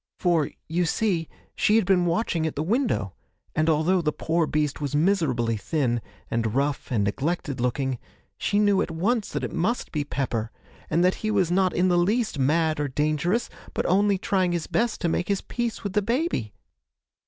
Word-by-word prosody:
For, 170 -5 +2 0.2
you 175 +2 +1
see, 175 -5 0 0.3
she 210 - +3
had 225 -3 +4
been 180 -2 +3
watching 170 -2 0
at 160 - -4
the 150 - -1
window, 205 - 0 0.4
and 155 +1 +2
although 160 +4 +3
the 150 -2 +1
poor 165 +1 0
beast 150 -1 -1
was 145 -1 -2
miserably 145 - +2
thin, 120 -1 0 0.3
and 115 -1 0
rough, 140 +1 -1
and 110 -5 +2
neglected 140 - -2
looking, 130 0 -1 0.4
she 205 - 0
knew 205 -2 +4
at - - -1
once 200 +7 0
that - - -3
it - - -3
must 215 +9 -1
be 150 -2 -1
Pepper, 125 -6 -2 0.4
and 170 +3 +3
that 185 - +4
he 215 - -1
was 190 -5 +2
not 185 0 +3
in 180 +2 +3
the 175 -1 +3
least 210 - +1
mad 155 +3 +2
or 145 - 0
dangerous, 155 - 0 0.3
but - - 0
only 200 +2 +3
trying 185 -2 +1
his 170 -2 -1
best 235 -1 0
to 175 - +1
make 170 +1 0
his 200 -1 0
peace 240 -2 -3
with 200 -2 -3
the 210 - +3
baby. 230 - -1
170 Hz, 190 wpm, -25 LUFS, 145-195 Hz, 0.4 s, had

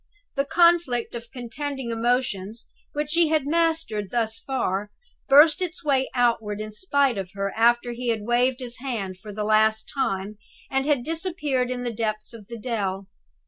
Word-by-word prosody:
The 275 0 +1
conflict 325 -6 +3
of 235 -1 -8
contending 265 +1 -5
emotions, 230 -3 -1 0.3
which 295 0 -2
she 335 0 +4
had 305 -3 +1
mastered 320 - 0
thus 225 -1 -1
far, 210 -7 -2 0.4
burst 300 +4 +7
its 360 -1 -3
way 270 -3 +2
outward 230 -4 +1
in 215 0 -5
spite 280 - +1
of 190 -2 -5
her 195 0 -2
after 240 +1 +3
he 245 +1 -5
had 225 -3 0
waved 245 +2 +2
his 240 -2 -5
hand 210 -8 -4
for 210 +2 -9
the 210 +1 -3
last 220 +1 +3
time, 205 -6 -2 0.3
and 270 +1 0
had 285 -5 +2
disappeared 315 -5 -1
in 250 -1 -3
the 240 -1 -3
depths 215 +1 -3
of 215 -4 -12
the 235 - -7
dell. 200 -4 -2
240 Hz, 170 wpm, -25 LUFS, 215-280 Hz, 0.4 s, burst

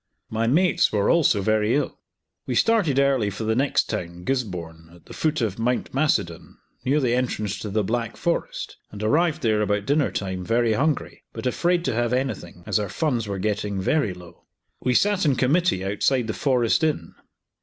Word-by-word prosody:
My 115 +1 0
mates 170 +9 +3
were 100 -2 +2
also 145 - +3
very 110 +2 +2
ill. 145 - -2 0.5
We - - -1
started 205 - +3
early 135 -6 +3
for 100 +3 -5
the 110 0 +1
next 135 +3 +2
town, 90 -4 -5
Gisborne, 90 -10 -4
at 85 - -20
the - - -11
foot 155 -2 0
of 110 -2 -2
Mount 125 +2 -1
Macedon, 130 - -1 0.3
near 140 +4 +2
the 125 -4 +1
entrance 115 -5 -1
to 105 - -5
the 105 +1 0
Black 115 +2 -2
Forest, 170 - -2
and 105 0 -8
arrived 155 +5 +1
there 110 -2 +2
about 105 -1 0
dinner 145 0 +2
time 95 -2 -4
very 115 +3 +2
hungry, 145 +6 -1
but - - -7
afraid 175 +7 +1
to - - 0
have 120 +1 0
anything, 125 -10 -3
as - - +1
our 105 -2 -3
funds 125 - -1
were 100 -1 -3
getting 105 0 -2
very 105 +3 +1
low. 90 -1 -15 0.3
We 125 -1 0
sat 205 +3 +3
in 145 -5 +3
committee 135 - +1
outside 115 +5 +1
the 110 - -3
Forest 125 - +1
Inn. 155 -2 -1
115 Hz, 185 wpm, -24 LUFS, 105-140 Hz, 0.5 s, mates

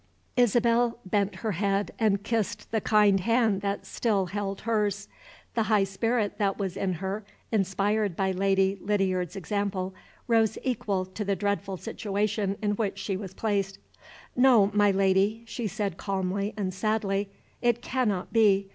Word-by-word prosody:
Isabel 240 -1 +3
bent 200 +1 0
her 220 - +1
head, 200 +2 0
and 205 -3 +2
kissed 215 -2 -2
the 220 -1 +1
kind 210 -2 +4
hand 225 -1 +2
that 200 0 -2
still 205 -5 0
held 200 +1 -4
hers. 210 -2 0 0.5
The 230 - +1
high 215 -2 +3
spirit 205 +2 -1
that 195 -2 +1
was 190 -3 -3
in 195 -1 -1
her, 190 +5 -4 0.3
inspired 200 -1 +1
by 190 +1 +1
Lady 195 +1 +2
Lydiard's 190 -3 0
example, 195 -1 -2 0.3
rose 225 -2 +3
equal 205 -7 -1
to 190 +3 -5
the 200 -1 0
dreadful 200 0 -2
situation 205 -1 -2
in 205 - +2
which 205 -2 -1
she 195 0 -2
was 190 -1 -7
placed. 200 -3 -1 0.6
"No, 245 -6 +5
my 205 0 +4
Lady," 195 +3 +2
she 230 0 -4
said 200 -2 -3
calmly 195 +1 -2
and 190 -3 -2
sadly; 200 0 0 0.3
"it 240 0 +1
cannot 215 -8 -1
be. 200 -3 +4
200 Hz, 150 wpm, -27 LUFS, 195-220 Hz, 0.6 s, No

